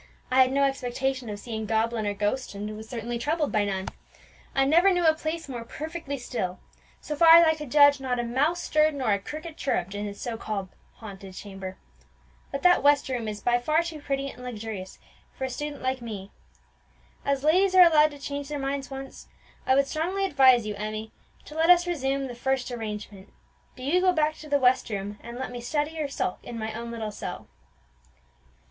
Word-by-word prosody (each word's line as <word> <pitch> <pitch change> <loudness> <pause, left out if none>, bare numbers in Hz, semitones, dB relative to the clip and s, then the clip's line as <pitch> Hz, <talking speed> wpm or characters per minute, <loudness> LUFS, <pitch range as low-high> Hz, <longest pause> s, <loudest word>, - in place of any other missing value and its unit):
"I 260 +1 +6
had 255 0 +4
no 280 +1 +2
expectation 265 -2 -1
of 205 - -4
seeing 220 0 -5
goblin 225 0 0
or 205 - -1
ghost, 210 +3 -2
and 210 +1 -5
was 220 +1 -10
certainly 235 0 -4
troubled 300 +3 0
by 210 -1 +2
none. 190 -1 -3 0.7
I 270 - +4
never 345 +7 +5
knew 355 -2 +1
a 320 - +6
place 315 +1 -4
more 245 -4 -5
perfectly 310 +2 -5
still; 190 -8 -4 0.4
so 300 - -4
far 330 +1 +8
as 335 0 +8
I 320 - +4
could 300 -3 -8
judge, 285 0 +6
not 255 -2 -1
a 240 - -1
mouse 290 +9 0
stirred 305 0 +2
or 255 -6 0
a 200 - +1
cricket 310 - -8
chirrupped 195 -8 -1
in 205 +1 -3
the 200 - -6
so 230 +2 -5
called 200 -4 -4 0.3
haunted 195 -3 -10
chamber. 195 -2 -8 0.7
But 275 - -4
that 360 -1 +6
west 285 -1 +4
room 245 -4 -2
is 210 -1 -5
by 240 0 +2
far 310 +7 +2
too 325 -3 -6
pretty 275 -1 -2
and 250 - -11
luxurious 220 -6 -6 0.4
for - - -5
a 260 - -2
student 295 +1 -5
like 260 0 -1
me. 205 -4 -7 0.9
As 280 -1 0
ladies 370 +5 +4
are 365 - +10
allowed 305 -2 +6
to 290 - -11
change 285 0 -5
their 295 - -3
minds 275 -1 -3
once, 270 0 -8 0.4
I 260 - +5
would 275 0 +4
strongly 355 +7 -1
advise 260 - +5
you, 210 - -3
Emmie, 215 +1 -5 0.3
to - - -11
let 325 +2 +2
us 350 0 +7
resume 275 -5 -1
the 250 - -6
first 255 +1 -1
arrangement: 210 -4 -6 0.4
do 255 - -10
you 335 +7 +2
go 370 0 +4
back 310 -2 +2
to 305 - -11
the 290 - +4
west 255 -2 +3
room, 205 0 -4
and 235 +1 -8
let 260 -1 -4
me 245 -1 -6
study 295 +5 -2
or 300 - 0
sulk 275 -9 -3
in 235 - -8
my 220 0 -4
own 235 +1 -6
little 225 -2 -4
cell." - - -7
260 Hz, 210 wpm, -26 LUFS, 220-300 Hz, 0.9 s, are